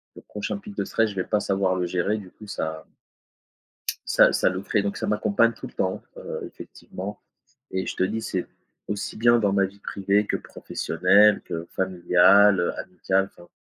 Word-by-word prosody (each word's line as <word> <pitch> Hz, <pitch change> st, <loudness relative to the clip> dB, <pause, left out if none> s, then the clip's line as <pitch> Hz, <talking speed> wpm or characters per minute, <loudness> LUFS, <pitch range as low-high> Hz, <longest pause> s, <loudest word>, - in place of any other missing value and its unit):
le -, -, -11 dB
prochain 105 Hz, -, -4 dB
pic 205 Hz, 0 st, -11 dB
de -, -, -1 dB
stress 115 Hz, -1 st, +1 dB
je -, -, -11 dB
vais 95 Hz, -, -1 dB
pas 105 Hz, -, +1 dB
savoir 95 Hz, -1 st, +1 dB
le 90 Hz, -1 st, -1 dB
gérer 90 Hz, +4 st, 0 dB
du 95 Hz, -4 st, -10 dB
coup 105 Hz, -, -14 dB
ça 80 Hz, -4 st, -4 dB, 1.2 s
ça -, -, +5 dB
ça -, -, +3 dB
le 95 Hz, +1 st, -4 dB
ferait. 105 Hz, +1 st, 0 dB
Donc 100 Hz, -, -2 dB
ça -, -, -3 dB
m'accompagne 105 Hz, +2 st, +2 dB
tout 130 Hz, -, -9 dB
le -, -, -16 dB
temps, 95 Hz, 0 st, -1 dB, 0.2 s
heu, -, -, -6 dB
effectivement 100 Hz, +3 st, -9 dB, 0.5 s
et 95 Hz, 0 st, -2 dB
je -, -, -4 dB
te -, -, +1 dB
dis 110 Hz, +4 st, -1 dB
c'est 95 Hz, -4 st, -3 dB, 0.4 s
aussi 105 Hz, -1 st, -4 dB
bien 120 Hz, +1 st, +5 dB
dans 100 Hz, -3 st, +2 dB
ma 100 Hz, 0 st, +3 dB
vie 100 Hz, +1 st, -10 dB
privée 100 Hz, +1 st, 0 dB
que -, -, 0 dB
professionnelle 105 Hz, 0 st, +2 dB
que 80 Hz, 0 st, -5 dB
familiale, 95 Hz, +2 st, +4 dB
heu, 85 Hz, -, 0 dB
amicale 95 Hz, +1 st, 0 dB
enfin 85 Hz, 0 st, -17 dB
100 Hz, 195 wpm, -25 LUFS, 95-105 Hz, 1.2 s, ça